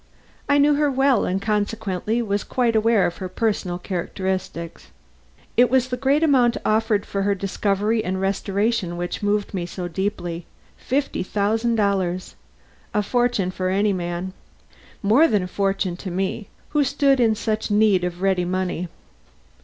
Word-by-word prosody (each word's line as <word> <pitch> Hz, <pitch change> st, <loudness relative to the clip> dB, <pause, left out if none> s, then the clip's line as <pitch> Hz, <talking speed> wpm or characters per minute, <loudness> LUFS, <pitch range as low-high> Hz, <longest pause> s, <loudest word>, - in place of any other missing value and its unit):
I 285 Hz, -, +5 dB
knew 290 Hz, +1 st, +5 dB
her 295 Hz, 0 st, +2 dB
well 270 Hz, -3 st, +2 dB
and 185 Hz, +1 st, 0 dB
consequently 210 Hz, +1 st, -1 dB
was 205 Hz, -2 st, -1 dB
quite 240 Hz, -3 st, 0 dB
aware 220 Hz, -2 st, +3 dB
of 175 Hz, -, -2 dB
her 185 Hz, -, -5 dB
personal 195 Hz, -4 st, -1 dB
characteristics. 185 Hz, -1 st, -4 dB, 0.7 s
It 245 Hz, 0 st, +5 dB
was 260 Hz, 0 st, +2 dB
the 250 Hz, -, -1 dB
great 275 Hz, +5 st, +2 dB
amount 255 Hz, -6 st, +4 dB
offered 215 Hz, -1 st, +1 dB
for 200 Hz, -, -3 dB
her 200 Hz, 0 st, +1 dB
discovery 200 Hz, +3 st, 0 dB
and 190 Hz, -1 st, -2 dB
restoration 195 Hz, 0 st, -1 dB
which 175 Hz, 0 st, -4 dB
moved 205 Hz, 0 st, 0 dB
me 175 Hz, -3 st, -3 dB
so 180 Hz, 0 st, -5 dB
deeply. 175 Hz, -2 st, -3 dB, 0.3 s
Fifty 275 Hz, +2 st, -2 dB
thousand 220 Hz, +5 st, 0 dB
dollars! 190 Hz, -4 st, 0 dB, 0.6 s
A 210 Hz, -, +2 dB
fortune 240 Hz, -4 st, +1 dB
for 185 Hz, 0 st, -2 dB
any 200 Hz, +2 st, +2 dB
man. 175 Hz, +1 st, -4 dB, 0.7 s
More 235 Hz, +11 st, +5 dB
than 210 Hz, -, +1 dB
a -, -, -4 dB
fortune 195 Hz, -1 st, -1 dB
to 190 Hz, -, -6 dB
me, 190 Hz, +3 st, -2 dB, 0.2 s
who 295 Hz, -1 st, +2 dB
stood 275 Hz, 0 st, +2 dB
in 225 Hz, -3 st, +3 dB
such 220 Hz, 0 st, -2 dB
need 205 Hz, -3 st, +3 dB
of 180 Hz, +1 st, -4 dB
ready 190 Hz, -2 st, +2 dB
money. 180 Hz, -1 st, -2 dB
205 Hz, 155 wpm, -22 LUFS, 185-230 Hz, 0.7 s, I